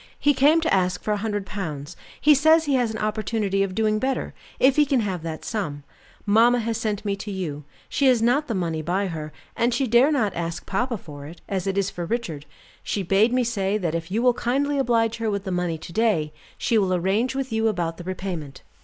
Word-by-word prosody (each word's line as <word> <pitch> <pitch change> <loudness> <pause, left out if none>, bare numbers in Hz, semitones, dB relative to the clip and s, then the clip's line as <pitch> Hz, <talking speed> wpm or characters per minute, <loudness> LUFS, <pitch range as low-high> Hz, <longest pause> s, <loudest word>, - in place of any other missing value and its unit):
He 290 - +3
came 295 +5 +4
to 320 - +1
ask 180 -1 +1
for 215 - -1
a 210 - +1
hundred 205 -1 -2
pounds; 155 -8 -5 0.2
he 300 - +6
says 315 +3 +5
he 285 - 0
has 250 -3 +2
an 220 - -4
opportunity 215 -2 -1
of 195 -2 -1
doing 215 0 +1
better, 265 +3 -2 0.3
if 265 0 +5
he 300 - +5
can 275 -4 +1
have 190 -5 -3
that 160 -1 -6
sum. 150 -10 -3 0.4
Mamma 230 +4 +5
has 230 -1 -2
sent 210 -2 -2
me 200 -1 0
to 210 - -7
you; 160 -7 -4 0.2
she 275 - +1
has 250 -3 +5
not 245 +7 +2
the 230 - -2
money 165 -4 -1
by 185 +5 0
her, 155 -2 -5 0.2
and 235 +1 +1
she 275 - +1
dare 245 +5 +4
not 230 -9 +1
ask 170 0 -4
papa 235 +4 -1
for 145 -5 -10
it, 165 +3 -12
as 195 -1 -2
it 195 0 -1
is 200 0 +1
for 175 -1 -5
Richard. 165 -10 -3 0.3
She 200 - -2
bade 195 +6 +3
me 250 0 +2
say 205 -4 0
that 175 -6 -2
if 165 0 -3
you 220 +5 0
will 250 -1 +5
kindly 280 +4 0
oblige 230 -3 +1
her 225 -1 -1
with 200 -1 -2
the 190 - -4
money 180 -2 -1
to 170 - -10
day, 175 -9 +1 0.2
she 230 - +2
will 185 -2 +1
arrange 200 +9 0
with 270 -3 -3
you 220 0 +2
about 175 -6 -1
the 175 - -8
repayment." 180 -6 -5
210 Hz, 235 wpm, -24 LUFS, 180-240 Hz, 0.4 s, he